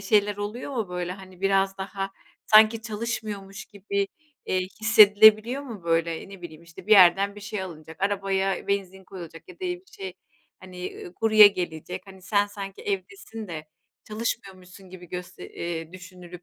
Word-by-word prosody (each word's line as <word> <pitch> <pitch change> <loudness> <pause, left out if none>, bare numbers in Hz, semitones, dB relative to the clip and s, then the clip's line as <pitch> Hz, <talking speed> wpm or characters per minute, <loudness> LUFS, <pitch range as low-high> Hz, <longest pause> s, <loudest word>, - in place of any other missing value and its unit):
şeyler 205 0 +2
oluyor 210 +7 -5
mu? 220 -5 -2
Böyle, 180 0 -3
hani, 185 -1 -13
biraz 195 0 +1
daha, 195 0 -4 0.4
sanki, 220 +1 +6
çalışmıyormuş 210 -3 -5
gibi, 200 -1 -3 0.4
eee, 185 - +1 0.2
hissedilebiliyor 220 +4 +6
mu? 230 -9 -9
Böyle, 165 +1 0
ne 195 -2 -12
bileyim, 165 -1 -10
işte, 170 +2 -14
bir 215 - +3
yerden 195 +1 +6
bir 205 - -11
şey 210 -1 -5
alınacak 160 -3 -10
arabaya 195 -1 0
benzin 190 -1 -2
koyulacak 170 -3 -11
ya 365 - -11
da - - -42
bir 360 -1 -3
şey, 190 -2 -7 0.5
hani, 180 -1 -8
ııı, 175 - -10
kurye 215 -1 +7
gelecek, 180 -2 -5
hani, 190 -1 -14
sen 205 +2 +2
sanki 200 -1 -8
evdesin 200 +2 -5
de 155 -2 -7 0.4
çalışmıyormuşsun 195 -4 -6
gibi 180 -2 -12
göste 180 0 -8
eee, 165 -1 -5
düşünülüp, 180 -1 -12
195 Hz, 155 wpm, -25 LUFS, 180-210 Hz, 0.5 s, kurye